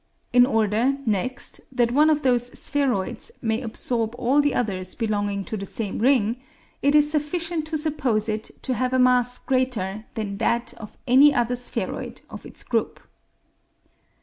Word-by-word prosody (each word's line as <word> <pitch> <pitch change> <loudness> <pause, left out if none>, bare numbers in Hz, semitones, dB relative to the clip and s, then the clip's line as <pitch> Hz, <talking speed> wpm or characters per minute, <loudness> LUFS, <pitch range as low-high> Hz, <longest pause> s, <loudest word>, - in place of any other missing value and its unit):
In 245 0 +6
order, 225 +3 +1
next, 220 +4 -2
that 240 -2 +1
one 300 +5 +4
of 300 -1 +1
those 245 -2 +2
spheroids 270 - 0
may 225 +1 0
absorb 230 -1 -2
all 265 +5 +3
the 290 -1 0
others 185 -6 -2
belonging 205 -3 -1
to - - -4
the 195 0 -6
same 210 -1 -4
ring, 235 -2 +2 0.4
it 285 +2 +3
is 295 0 +5
sufficient 315 +1 -1
to 315 0 -2
suppose 265 -9 0
it 215 0 -2 0.2
to 260 - -1
have 255 +1 -1
a - - +3
mass 250 -1 +3
greater 225 -6 -1
than 205 -3 -4
that 235 0 0
of 215 - -11
any 275 +3 +6
other 240 0 +1
spheroid 245 0 -4
of - - -9
its - - -10
group. - - -1
245 Hz, 160 wpm, -24 LUFS, 220-275 Hz, 0.4 s, In